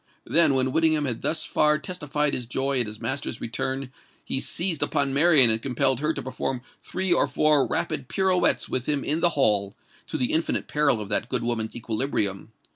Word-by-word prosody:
Then, 145 +2 +4
when 130 0 +1
Whittingham 155 0 +2
had 120 -4 -3
thus 160 - -1
far 150 0 +2
testified 150 -3 -3
his 125 -2 -1
joy 135 +2 -1
at 120 - -2
his 105 0 -7
master's 135 -3 -4
return, 130 +3 -4 0.3
he 135 - -1
seized 170 +2 0
upon 140 -3 0
Marian 145 -5 +6
and 110 0 0
compelled 130 0 0
her 150 +2 0
to - - -5
perform 130 -1 -4 0.2
three 185 -1 -1
or - - +2
four 150 -2 +2
rapid 130 - -3
pirouettes 190 +1 +1
with 130 -1 -3
him 145 -2 0
in 155 +3 -1
the 175 +1 +4
hall—to 100 -6 -1
the 125 - -1
infinite 160 +1 0
peril 150 -6 +2
of 100 - -6
that 115 - 0
good 125 -2 0
woman's 115 -2 -2
equilibrium. 110 -4 -2
135 Hz, 190 wpm, -25 LUFS, 120-155 Hz, 0.3 s, Marian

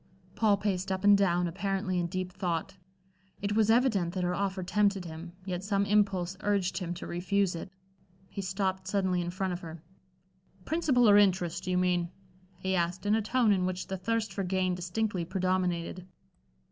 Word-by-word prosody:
Paul 210 -3 +3
paced 195 -2 -2
up 190 0 -2
and 205 0 +7
down, 180 -3 +2
apparently 190 +1 -1
in 175 - 0
deep 185 +1 -4
thought. 180 +1 -2 0.6
It 205 +1 -2
was 220 -1 +3
evident 225 -8 +2
that 185 - -1
her 180 0 0
offer 195 0 -2
tempted 200 0 +1
him, 165 +1 -8
yet 180 -1 -3
some 200 0 +1
impulse 195 -3 +1
urged 200 -2 0
him 175 -2 -4
to - - -7
refuse 185 +2 0
it. 170 +3 -7 0.6
He 200 - -6
stopped 190 0 -2
suddenly 190 -2 +1
in 175 - -3
front 185 +1 -2
of 175 - -4
her. 165 -3 -9 0.8
"Principal 280 -7 +3
or 205 -1 +7
interest, 180 -2 +1
do - - -3
you 180 - +1
mean?" 180 -1 +1 0.5
he 190 +1 -2
asked, 175 +2 -1
in 205 - +3
a 220 - +3
tone 230 +1 +2
in 185 -2 +2
which 185 0 -3
the 190 - -4
thirst 225 +3 -1
for 200 - -2
gain 185 0 0
distinctly 180 +2 -2
predominated. 185 -1 -1
185 Hz, 185 wpm, -30 LUFS, 180-200 Hz, 0.8 s, and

